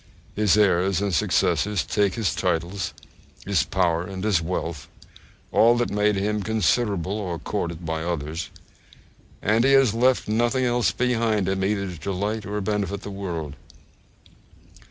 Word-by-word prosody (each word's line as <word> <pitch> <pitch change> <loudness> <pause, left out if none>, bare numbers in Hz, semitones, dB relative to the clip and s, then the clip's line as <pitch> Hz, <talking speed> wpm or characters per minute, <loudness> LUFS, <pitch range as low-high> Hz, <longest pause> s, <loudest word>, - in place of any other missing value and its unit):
His 105 -1 +3
heirs 95 -2 +3
and 100 -2 -1
successors 100 +4 +1
take 100 -2 +1
his 115 -5 0
titles, 85 0 -1 0.5
his 100 -6 +2
power, 85 +4 +1
and 95 +1 -6
his 105 -6 +2
wealth 80 -4 -4 0.6
all 120 +2 +5
that 120 - 0
made 105 0 +2
him 105 +2 -1
considerable 105 -3 0
or 90 -5 -3
courted 85 -3 -4
by 80 0 -2
others; 85 -1 -3 0.9
and 110 +3 +3
he 135 +1 +4
has 135 -5 +5
left 125 +2 +2
nothing 120 +4 +1
else 120 -1 +2
behind 115 -5 0
him 95 0 0
either 100 0 0
to 90 -3 -6
delight 100 +5 -3
or 105 +1 -2
benefit 100 0 -2
the 100 - -6
world. 85 -7 -5
100 Hz, 145 wpm, -24 LUFS, 90-110 Hz, 0.9 s, all